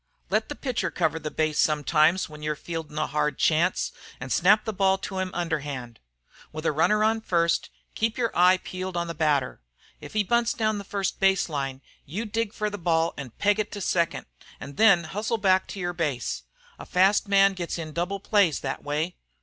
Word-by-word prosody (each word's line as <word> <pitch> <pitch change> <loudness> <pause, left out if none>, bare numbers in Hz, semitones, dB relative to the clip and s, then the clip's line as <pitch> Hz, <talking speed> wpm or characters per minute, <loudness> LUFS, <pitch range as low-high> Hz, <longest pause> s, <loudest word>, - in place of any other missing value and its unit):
Let - - +1
the - - -4
pitcher 255 -4 -2
cover 160 +1 0
the 155 - -4
base 155 0 -1
sometimes 155 +3 +3
when 150 -1 -12
you're 150 0 -2
fieldin' 155 0 -6
a 155 - +1
hard 150 -1 -1
chance, 170 +3 +2 0.3
an' 125 +1 -7
snap 205 +5 +4
the 220 - -2
ball 190 0 +3
to 190 0 -5
him 185 0 -1
underhand. 145 -8 -3 0.5
With 155 +1 -7
a - - +3
runner 210 +8 +2
on 220 +1 +2
first, 170 -4 +1 0.2
keep 225 +1 -1
your 235 -3 -1
eye 180 +1 +6
peeled 185 0 -6
on 170 - 0
the 170 - -5
hitter. 150 - 0 0.4
If - - -11
he 215 -1 +2
bunts 235 +3 +1
down 215 -2 0
the - - -6
first 195 -1 -3
base 195 -2 +3
line, 135 -3 -4 0.2
you 200 +11 -5
dig 225 0 -2
for 210 -1 -2
the 205 - -6
ball 165 -1 +1
an 140 -3 -7
peg 205 +1 +2
it 210 - -2
to 205 - -5
second, 170 -3 0 0.3
an' 140 - -8
then 195 0 +5
hustle 210 +7 -2
back 190 -2 +3
to 200 - -7
your 175 -1 -2
base. 145 - -2 0.4
A - - -8
fast 195 +3 +3
man 195 0 +5
gets 175 -2 -4
in 155 -2 -6
double 180 +4 -2
plays 200 -6 +2
thet 135 -1 -4
way. 150 +4 -2
175 Hz, 205 wpm, -26 LUFS, 155-200 Hz, 0.5 s, eye